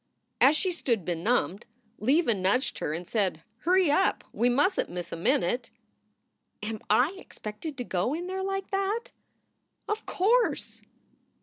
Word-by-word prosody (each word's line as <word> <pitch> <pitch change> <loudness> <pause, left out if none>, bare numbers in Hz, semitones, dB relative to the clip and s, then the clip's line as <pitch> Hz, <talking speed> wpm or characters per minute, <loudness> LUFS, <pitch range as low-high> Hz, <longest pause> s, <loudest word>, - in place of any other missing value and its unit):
As 290 +3 +6
she 370 +3 +1
stood 235 - -1
benumbed 185 +3 0 0.3
Leva 265 +3 +3
nudged 200 +7 0
her - - -2
and 170 +3 -4
said, 190 -7 0 0.2
"Hurry 360 0 +3
up; 380 +6 +2
we 240 +2 +2
mustn 290 +10 +2
t - - -13
miss 175 -1 -5
a - - -3
minute." 175 +7 +1 0.9
"Am 215 0 -3
I 250 - +4
expected 255 - -7
to 250 - -3
go 210 +6 -1
in 345 +2 -4
there 375 +1 -3
like 390 0 -3
that?" 395 +4 -1 0.8
"Of 430 +1 -3
course!" 460 +6 +1
255 Hz, 145 wpm, -28 LUFS, -, 0.9 s, As